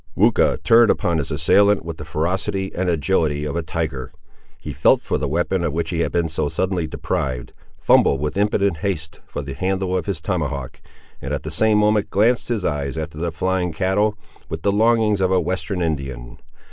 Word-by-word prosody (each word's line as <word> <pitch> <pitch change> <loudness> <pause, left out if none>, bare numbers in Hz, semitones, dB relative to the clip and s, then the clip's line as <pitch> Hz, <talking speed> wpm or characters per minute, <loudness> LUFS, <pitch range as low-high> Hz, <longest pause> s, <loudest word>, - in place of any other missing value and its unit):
Weucha - - +3
turned 115 0 +6
upon 85 -5 +1
his 75 - -3
assailant 100 -4 +3
with 85 -1 -6
the 75 - -8
ferocity 95 +5 -2
and 90 0 -1
agility 80 -3 +1
of 75 - -3
a 85 - 0
tiger. 75 -6 -4 0.5
He - - -7
felt - - +4
for - - -2
the 75 - -1
weapon 85 +4 0
of 80 -4 -1
which 85 +2 -2
he 85 - -2
had 85 - 0
been 85 -1 +1
so 80 -2 -2
suddenly 90 -2 -1
deprived, 65 -5 -3 0.2
fumbled 70 - +4
with 75 +1 -2
impotent 100 -3 +1
haste 80 -2 -3
for 75 - -5
the 70 0 -6
handle 95 +2 -1
of 90 - -2
his 95 -5 -2
tomahawk, 75 -6 -3 0.4
and - - -2
at - - -6
the - - -5
same 110 -1 +3
moment 105 0 +2
glanced 115 +5 +2
his 115 -5 -1
eyes 70 -1 -2
after 80 -1 -5
the 85 0 -2
flying 90 +1 -1
cattle, 100 +5 +1 0.3
with 80 -1 -5
the 100 - +3
longings 110 -1 +3
of 95 - +2
a 95 -1 +3
Western 95 0 -2
Indian. 70 -6 -4
85 Hz, 195 wpm, -21 LUFS, 75-100 Hz, 0.5 s, turned